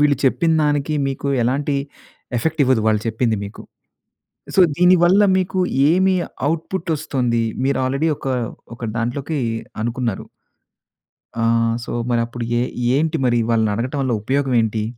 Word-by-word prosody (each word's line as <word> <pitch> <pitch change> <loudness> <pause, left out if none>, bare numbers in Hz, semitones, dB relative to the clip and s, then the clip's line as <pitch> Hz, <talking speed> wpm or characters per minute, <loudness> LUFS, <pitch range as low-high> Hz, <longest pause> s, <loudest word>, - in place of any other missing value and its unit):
వీళ్ళు 145 -2 +4
చెప్పిందానికి 150 -1 +2
మీకు 135 +1 -4
ఎలాంటి 140 +4 0 0.6
ఎఫెక్ట్ 160 +5 -1
ఇవ్వదు. 130 -3 +3
వాళ్ళు 110 -1 +2
చెప్పింది 110 0 0
మీకు. 100 - -9 0.9
సో 190 - +6 0.2
దీని 180 +1 +6
వల్ల 190 +4 +5 0.2
మీకు 185 0 -1 0.3
ఏమి 185 +2 +3 0.4
ఔట్‌పుట్ 165 +2 -4
వస్తుంది? 120 -5 -1 0.2
మీరు 140 - +1
ఆల్రెడీ 140 +5 0
ఒక - - -7 0.5
ఒక 120 - -19 0.2
దాంట్లోకి 135 +6 -2 0.5
అనుకున్నారు. 120 -3 -2 1.2
ఆహ్, 115 0 +2
సో - - -6 0.2
మరి 120 -1 +2
అప్పుడు 120 0 -6 0.2
ఏ - - +1 0.4
ఏంటి 160 +1 0
మరి 120 -1 +2
వాళ్ళని 110 -2 +2
అడగటం 130 +6 -3
వల్ల 130 -3 0
ఉపయోగం 135 +1 0
ఏంటి? 110 -1 -1
135 Hz, 135 wpm, -20 LUFS, 115-160 Hz, 1.2 s, సో